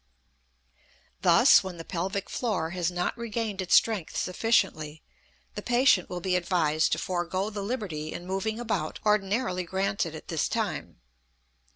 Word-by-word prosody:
Thus, - - +6
when 185 -2 -6
the 165 - -8
pelvic 190 +3 -3
floor 195 -9 -2
has 180 -2 -1
not 180 0 -2
regained 225 -3 -3
its 185 - +3
strength 215 -8 +2
sufficiently, 160 -7 0 0.5
the 205 - -5
patient 240 -5 +3
will 180 -1 -5
be 185 +1 0
advised 165 -4 +1
to - - +1
forego 185 +3 -2
the 205 -1 -4
liberty 195 -9 -4
in 175 - -7
moving 195 +4 -2
about 220 -10 -2
ordinarily 210 -1 +1
granted 190 -2 -1
at 155 - -10
this 160 -3 -1
time. - - -3
185 Hz, 145 wpm, -27 LUFS, 175-210 Hz, 0.5 s, Thus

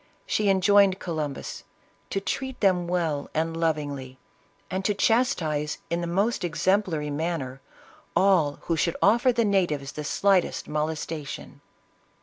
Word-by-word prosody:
She 210 -1 +1
enjoined 195 0 +5
on - - -25
Columbus, 155 -7 -4 0.2
" - - -37
to 195 - -1
treat 265 +7 -4
them 180 -4 +2
well 165 -5 -1
and 165 +1 0
lovingly, 145 -5 -2 0.5
and 190 +1 -2
to 205 +1 +1
chastise, 170 - +1
in 170 +1 0
the 170 - -2
most 200 +7 0
exemplary 170 -3 0
manner, 145 -4 -3 0.5
all 180 -7 +4
who 165 - -1
should 160 - 0
offer 240 +3 +5
the 235 -1 +1
natives 170 -9 +1
the 150 - -6
slightest 190 +4 +1
molestation." 155 0 -4
170 Hz, 135 wpm, -26 LUFS, 150-195 Hz, 0.5 s, enjoined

